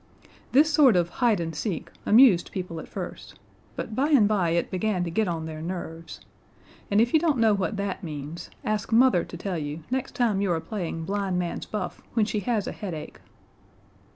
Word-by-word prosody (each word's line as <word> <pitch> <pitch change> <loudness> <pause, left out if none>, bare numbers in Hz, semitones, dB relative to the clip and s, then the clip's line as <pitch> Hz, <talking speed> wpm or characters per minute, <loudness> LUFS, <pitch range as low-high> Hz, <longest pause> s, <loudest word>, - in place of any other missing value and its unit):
This 300 +4 +5
sort 280 -8 +6
of 175 -1 +2
hide 230 -6 +4
and 165 -1 -3
seek 165 +2 -3 0.2
amused 220 -5 +6
people 180 -3 -5
at - - -9
first, - - -7 0.4
but 220 - -5
by 275 +7 +1
and 260 -9 +5
by 195 -5 +1
it 170 +1 0
began 185 -1 0
to 170 - -3
get 215 +4 +1
on 165 -2 -2
their 155 -1 -6
nerves: 165 -1 -6 0.7
and 200 - +3
if 235 +2 +2
you 315 - +6
don't 310 -4 +1
know 225 -2 +4
what 200 +1 -1
that 200 -1 -3
means, 155 +1 -6 0.2
ask 215 0 -1
Mother 230 -6 +5
to 170 - -9
tell 180 -1 -3
you 150 +1 -5
next 260 0 -2
time 220 -5 +1
you 200 -3 +1
are 165 - +1
playing 165 -4 -4
blind 195 -1 -1
man's 175 -1 -3
buff 200 -4 -4
when 220 -3 +3
she 210 0 -1
has 215 -1 -1
a - - -3
headache. 170 -7 -7
195 Hz, 200 wpm, -26 LUFS, 170-220 Hz, 0.7 s, sort